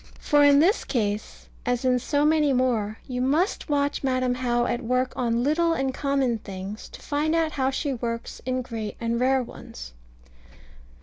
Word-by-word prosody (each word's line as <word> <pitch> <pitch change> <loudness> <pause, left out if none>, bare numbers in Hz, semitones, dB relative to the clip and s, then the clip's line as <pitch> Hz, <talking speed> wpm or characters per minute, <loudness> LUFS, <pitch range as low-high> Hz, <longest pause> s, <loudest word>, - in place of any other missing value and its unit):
For 290 -1 +3
in 285 -1 +7
this 355 +10 +3
case, 210 -4 -3 0.2
as 245 +1 -1
in 250 -1 +3
so 285 +4 +1
many 300 -2 +3
more, 230 -4 0
you 250 -1 -3
must 310 +10 0
watch 285 -1 0
Madam 255 -1 +1
How 240 -1 0
at 240 - -1
work 255 +2 0
on 235 -1 0
little 330 +4 +2
and 270 -4 -1
common 270 -4 0
things, 195 +2 -7
to - - -12
find 300 +2 0
out 325 -1 +1
how 265 -3 0
she 275 +1 -2
works 230 -1 -5
in 255 0 -1
great 225 -4 -5
and 230 0 -1
rare 260 +1 +3
ones. - - -10
255 Hz, 175 wpm, -25 LUFS, 235-285 Hz, 0.2 s, in